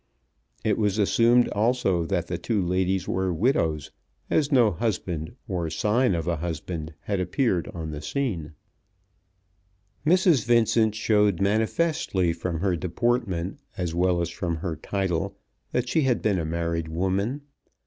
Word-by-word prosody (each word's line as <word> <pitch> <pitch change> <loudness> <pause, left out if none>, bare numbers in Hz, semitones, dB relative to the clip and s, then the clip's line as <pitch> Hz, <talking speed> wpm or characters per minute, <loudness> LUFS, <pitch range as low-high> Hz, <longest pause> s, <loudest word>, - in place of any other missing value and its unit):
It 110 -1 +1
was 105 -1 +1
assumed 115 +4 +4
also 105 -6 +1
that 90 -3 0
the 85 0 -4
two 115 -3 0
ladies 95 +1 0
were 95 0 0
widows, 80 - 0 0.4
as 150 -1 +2
no 120 -6 +5
husband 90 -4 -3
or 90 -5 -2
sign 105 +6 +2
of 85 0 -3
a 85 -1 0
husband 80 -1 -5
had 100 -2 -2
appeared 90 0 0
on 80 -2 -5
the 75 -1 -6
scene. 85 - -3 1.5
Mrs. 170 - +4
Vincent 115 -2 +3
showed 105 -4 +2
manifestly 105 - +1
from 85 -1 -3
her 95 -2 +1
deportment, 95 - -1 0.2
as 90 -3 -2
well 90 0 +2
as 85 -1 -2
from 85 -1 -2
her 80 0 -3
title, 90 +1 -2 0.3
that 125 0 0
she 160 +5 +2
had 130 -5 +1
been 100 -4 +2
a 80 - -2
married 85 0 -2
woman. 95 - -1
95 Hz, 145 wpm, -25 LUFS, 85-115 Hz, 1.5 s, no